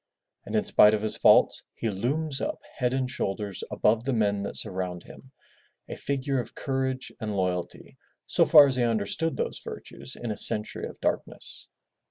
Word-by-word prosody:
And - - -4
in 215 - +3
spite 110 - +6
of 105 - -4
his 110 - 0
faults, - - +5
he 115 - -2
looms 135 +8 -2
up - - -2 0.2
head 125 -2 +1
and 130 0 0
shoulders 100 -4 -3
above 110 +2 +2
the 135 +1 -1
men 105 -3 +1
that 100 - -5
surround 90 -2 -3
him, 130 - -14 0.6
a - - -6
figure 140 -1 -2
of 120 - -6
courage 130 -1 -2
and 105 -2 -3
loyalty, 90 -2 -3 0.3
so - - +3
far 150 -2 +9
as 135 -2 0
he 125 - +2
understood 115 +8 0
those - - -3
virtues - - -9
in 120 -2 -5
a 105 - -4
century 105 +1 0
of - - -12
darkness. - - -3
115 Hz, 180 wpm, -27 LUFS, 100-135 Hz, 0.6 s, far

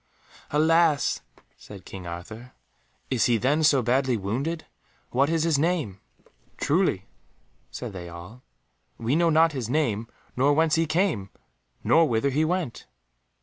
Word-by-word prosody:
"Alas!" 160 -1 +3 0.4
said 100 -2 -12
King 95 -2 -9
Arthur, 110 +9 -8 0.6
"is 125 -4 +2
he 120 -2 +3
then 140 +7 +1
so 140 -4 +4
badly 130 +1 +1
wounded? 135 - -3 0.5
What 135 +4 +2
is 165 -1 +1
his 160 -4 +2
name?" 155 - -1 0.6
"Truly," 150 - +1 0.6
said 120 -5 -7
they 90 -2 -7
all, 90 +8 -11 0.6
"we 120 +4 0
know 170 +1 +3
not 165 +1 +4
his 130 -6 -4
name, 120 -7 0 0.3
nor 140 +3 +3
whence 160 +1 +2
he 165 0 +2
came, 155 - 0 0.5
nor 165 -1 +4
whither 115 +4 +1
he 150 +4 +1
went." 165 -6 -2
135 Hz, 140 wpm, -25 LUFS, 110-160 Hz, 0.6 s, so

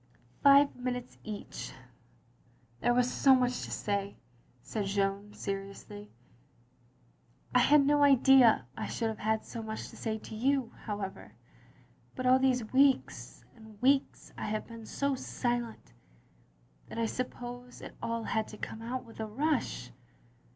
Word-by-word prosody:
Five 280 0 +6
minutes 250 0 -5
each. 210 -2 -7 1.1
There 240 - +2
was 250 0 +2
so 270 -1 +6
much 250 -1 +1
to - - -9
say, 200 -1 -2 0.2
" 125 +1 -35
said 210 -3 -3
Jeanne, 200 +1 -1
seriously. 200 +1 -6 0.8
" - - -32
I 250 - +6
had 280 +3 +5
no 290 +1 +3
idea 265 - +6
I - - -4
should 225 -1 -1
have 220 - -6
had 220 0 0
so 230 - -6
much 220 0 -6
to - - -13
say 220 -1 -3
to 220 - -10
you, 265 +1 +1
however. 205 -3 -5 0.8
But 255 - -4
all 255 +1 +6
these 250 -4 +1
weeks 270 0 +2
and 220 -2 -15
weeks 270 +3 +1
I - - -3
have 215 0 -2
been 230 -2 -10
so 280 0 0
silent 240 - -3 0.9
that - - -9
I 230 - +1
suppose 245 +1 -5
it - - -10
all 230 0 -2
had 220 -1 -1
to 215 - -10
come 220 - -6
out 245 +2 -4
with 225 - -14
a 220 - -3
rush. 250 - -1
230 Hz, 150 wpm, -31 LUFS, 210-255 Hz, 1.1 s, Five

